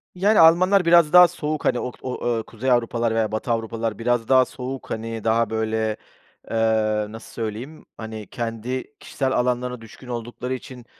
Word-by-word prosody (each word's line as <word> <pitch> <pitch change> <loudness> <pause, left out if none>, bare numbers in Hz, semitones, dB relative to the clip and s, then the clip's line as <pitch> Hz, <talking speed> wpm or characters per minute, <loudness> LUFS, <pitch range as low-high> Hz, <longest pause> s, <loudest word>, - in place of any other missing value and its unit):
Yani, 205 +4 +3
Almanlar 180 +3 +5
biraz 170 -2 +5
daha 180 0 +10
soğuk. 155 -3 -4
Hani, 120 - +2
ok 125 - -5
o 130 - -4 0.3
o, 110 - -5
kuzey 125 +3 -3
Avrupalılar 115 -1 +1
veya 110 -2 0
batı 110 +2 -2
Avrupalılar 115 -1 -2
biraz 120 -1 0
daha 130 -1 +5
soğuk. 130 +1 -7
Hani, 115 0 -4
daha, 115 +1 +2
böyle, 110 -1 -1 0.5
eee, - - -2 0.5
nasıl 110 +2 -11
söyleyeyim? 115 +7 -6
Hani, 110 -2 -7
kendi 120 +5 -5
kişisel 135 -2 -2
alanlarına 125 -1 -1
düşkün 115 +3 -14
oldukları 120 +1 -5
için 125 -1 -9
120 Hz, 165 wpm, -23 LUFS, 115-130 Hz, 0.5 s, daha